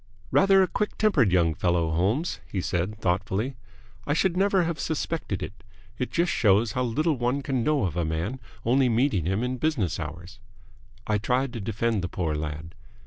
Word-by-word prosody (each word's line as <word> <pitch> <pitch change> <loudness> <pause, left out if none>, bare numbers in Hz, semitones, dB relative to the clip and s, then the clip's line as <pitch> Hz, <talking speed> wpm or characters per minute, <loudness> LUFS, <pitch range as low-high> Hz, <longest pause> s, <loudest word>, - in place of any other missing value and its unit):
"Rather 195 0 +5
a - - +1
quick 210 +3 -2
tempered 145 - +3
young 85 -3 +3
fellow, 85 0 +1
Holmes!" 105 - 0
he 100 - -3
said, 90 +4 -2
thoughtfully. 100 +6 -1 0.5
"I 145 - +1
should 180 +1 +2
never 195 0 +3
have 165 -1 -2
suspected 155 - -2
it. 100 0 -9 0.4
It 125 - -1
just 175 +1 +1
shows 105 +1 +3
how 125 - -1
little 140 +4 0
one 125 +3 0
can 130 -4 -1
know 150 -1 +2
of 85 -4 -3
a 85 - 0
man, 80 +11 -2 0.3
only 130 +2 +3
meeting 115 - +1
him 95 +5 0
in 125 +1 -2
business 125 - 0
hours." 90 +4 -7 0.7
I 105 -1 +1
tried 125 +4 0
to 115 - -5
defend 110 +1 -1
the 90 - -3
poor 85 -5 -2
lad. 75 +1 -5
115 Hz, 185 wpm, -26 LUFS, 90-140 Hz, 0.7 s, Rather